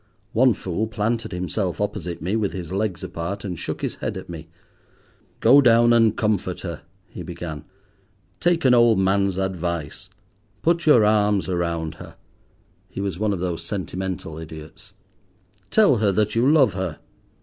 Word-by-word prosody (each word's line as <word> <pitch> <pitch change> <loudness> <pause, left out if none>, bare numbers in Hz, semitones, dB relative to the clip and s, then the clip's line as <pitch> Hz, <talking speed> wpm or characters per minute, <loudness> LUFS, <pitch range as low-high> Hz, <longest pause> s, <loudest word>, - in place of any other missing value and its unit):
One 125 -1 +4
fool 95 +5 -3
planted 115 +2 -2
himself 90 +1 -2
opposite 90 -6 -3
me 95 +5 -1
with 105 -3 -1
his 90 -3 -6
legs 95 -3 -2
apart, 90 +3 -5
and 90 -5 -5
shook - - -5
his - - -3
head - - -4
at - - -9
me. 80 -2 -8 0.9
"Go 135 +5 +7
down 120 -2 +5
and 115 -2 +4
comfort 100 -4 -1
her," 85 -4 -6 0.3
he - - -9
began. 80 -4 -7 0.7
"Take 175 -4 +1
an 130 - +6
old 120 -3 +5
man's 95 0 +1
advice. 85 -5 -3 0.5
Put 170 0 +1
your 120 -8 +6
arms 105 -2 +2
around 85 -3 -2
her." - - -11 0.7
(He - - -8
was 100 -3 -3
one 105 -1 +1
of 95 -3 -3
those 85 -2 -3
sentimental 95 -3 -5
idiots.) 80 0 -11 0.8
"Tell 210 - +4
her 105 -2 +2
that 105 +2 +1
you 120 +4 +3
love 150 -4 +4
her." 90 -4 -3
95 Hz, 160 wpm, -23 LUFS, 85-110 Hz, 0.9 s, Go